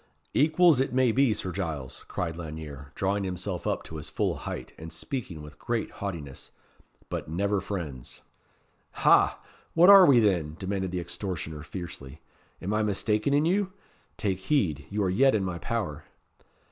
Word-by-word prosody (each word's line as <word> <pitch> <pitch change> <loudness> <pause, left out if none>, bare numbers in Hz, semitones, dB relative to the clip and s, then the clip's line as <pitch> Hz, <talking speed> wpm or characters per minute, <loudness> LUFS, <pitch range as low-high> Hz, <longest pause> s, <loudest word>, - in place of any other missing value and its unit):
"Equals, 155 0 +5
it 135 - +1
may 130 -2 +4
be, 135 +1 +3
Sir 95 -3 -2
Giles!" 80 -8 -4
cried 85 -2 -3
Lanyere, 75 -4 -8
drawing 100 +1 0
himself 90 -1 -3
up - - -1
to 80 - -8
his 75 - -6
full - - 0
height, - - -6
and 80 +1 -9
speaking 90 - -5
with 75 - -12
great 120 -2 -2
haughtiness; 85 -9 -6 0.6
"but - - -4
never 100 +4 0
friends." 75 -11 -6 0.7
"Ha! - - +4 0.4
what 175 +4 +8
are 195 -3 +10
we, 130 -4 +7
then?" 85 -8 +1
demanded 95 -1 -2
the 90 0 -2
extortioner, 85 -3 -4
fiercely. 75 -4 -8 0.4
"Am 100 +4 -1
I 110 - +2
mistaken 105 +4 +1
in 145 +2 +3
you? 190 +2 +1 0.4
Take 95 -4 -1
heed. 95 - 0
You 105 0 -1
are 95 - +1
yet 130 +6 +4
in 100 - +1
my 90 -2 -3
power." - - -3
95 Hz, 160 wpm, -28 LUFS, 80-115 Hz, 0.7 s, are